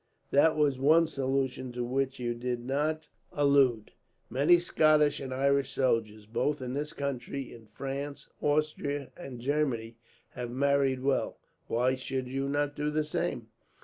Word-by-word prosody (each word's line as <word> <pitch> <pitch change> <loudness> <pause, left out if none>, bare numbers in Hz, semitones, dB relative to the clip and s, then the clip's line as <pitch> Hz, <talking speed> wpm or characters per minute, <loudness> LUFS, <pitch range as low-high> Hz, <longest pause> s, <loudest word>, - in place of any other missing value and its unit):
There 150 +3 +5
was 150 -4 +1
one 160 +5 +5
solution 135 -3 -2
to 120 0 -2
which 130 +2 -1
you 120 -1 -2
did 120 0 -3
not 150 +3 -1 0.2
allude. 140 -6 +3 0.4
Many 145 +8 +5
Scottish 155 -3 +3
and 135 -2 -6
Irish 140 +1 +2
soldiers, 110 -5 0
both 145 +7 -1
in 125 -1 -4
this 150 +2 -3
country, 140 -1 -4
in 115 -2 -14
France, 140 +4 -5
Austria, 145 -2 0
and 135 -8 -8
Germany, 120 -4 -1 0.3
have 125 -2 -5
married 135 0 +1
well. 135 -1 0 0.3
Why 125 +3 +2
should 130 0 -3
you 135 +2 -2
not 145 0 0
do 150 0 -1
the 155 +1 0
same?" 150 - -3
135 Hz, 145 wpm, -30 LUFS, 125-145 Hz, 0.4 s, There